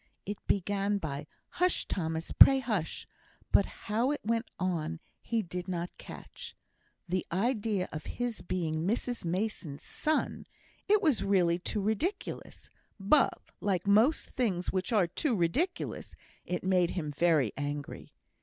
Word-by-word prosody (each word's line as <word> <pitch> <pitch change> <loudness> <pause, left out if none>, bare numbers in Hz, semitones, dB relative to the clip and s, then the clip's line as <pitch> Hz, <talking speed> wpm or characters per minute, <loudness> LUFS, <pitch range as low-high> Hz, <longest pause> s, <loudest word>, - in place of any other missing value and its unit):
It 205 +1 -4
began 200 +1 +1
by 150 -5 -5 0.2
"Hush, 360 +1 +1
Thomas; 160 -2 -3
pray 270 - +9
hush!" 215 -11 -2 0.5
but 200 - +5 0.2
how 225 +5 +1
it 295 - -1
went 230 +1 0
on 165 -3 -1 0.2
he 230 -2 -1
did 180 0 -5
not 175 -1 -3
catch. - - -9 0.5
The 180 +1 0
idea 205 0 0
of 155 - -6
his 245 -2 -2
being 165 -2 -2
Mrs 240 +3 -1
Mason's 175 -5 -3
son! 310 0 -1 0.4
It 415 0 +4
was 295 - +3
really 180 -4 +3
too 205 +3 -2
ridiculous; 300 - -3 0.3
but, 240 +8 +3 0.2
like 190 -3 0
most 220 +10 +3
things 190 -8 0
which 185 +5 -1
are 210 -5 +4
"too 240 - 0
ridiculous," 265 - -1 0.3
it 180 -1 -2
made 180 -2 +3
him 150 -4 -2
very 150 -6 +2
angry. 145 0 -5
195 Hz, 135 wpm, -31 LUFS, 170-230 Hz, 0.5 s, pray